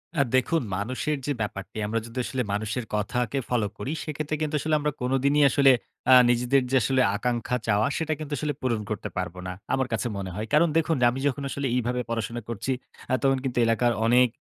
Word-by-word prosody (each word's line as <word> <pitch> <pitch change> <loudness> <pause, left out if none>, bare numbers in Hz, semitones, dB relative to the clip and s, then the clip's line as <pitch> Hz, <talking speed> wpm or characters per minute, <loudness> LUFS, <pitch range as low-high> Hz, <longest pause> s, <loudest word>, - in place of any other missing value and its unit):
আ 140 - +3
দেখুন 160 +6 +2
মানুষের 130 +9 -2
যে 145 - -1
ব্যাপারটি 100 0 -5
আমরা 115 +2 0
যদি 115 +2 -11
আসলে 130 -1 -2
মানুষের 110 +3 -2
কথাকে 120 +5 -1
ফলো 115 -4 +1
করি। 135 - -4
সেক্ষেত্রে 155 0 -3
কিন্তু 155 0 -1
আসলে 155 +1 +1
আমরা 150 0 0
কোনদিনই 135 +3 +2
আসলে 135 +1 +5 0.4
আ - - +10 0.2
নিজেদের 125 +3 +3
যে - - +2
আসলে 130 -1 +2
আকাঙ্ক্ষা 120 +2 -1
চাওয়া 105 +4 +3
সেটা 160 -1 -1
কিন্তু 155 -1 -5
আসলে 150 +2 -1
পূরণ 115 -4 0
করতে 105 - -3
পারব 90 -1 -3
না। 90 - -4 0.2
আমার 130 -1 +1
কাছে 115 +2 -1
মনে 95 -2 -4
হয়। 110 +2 -4
কারণ 170 +3 +5
দেখুন 165 0 +2 0.2
আমি 130 - -4
যখন 140 +1 -2
আসলে 140 0 -2
এইভাবে 125 0 0
পড়াশোনা 115 +1 -3
করছি, 115 +4 -3 0.4
আ - - +2
তখন 135 0 +3
কিন্তু 130 -3 -3
এলাকার 120 +1 +2
অনেক 125 +1 +5
125 Hz, 200 wpm, -26 LUFS, 115-140 Hz, 0.4 s, আ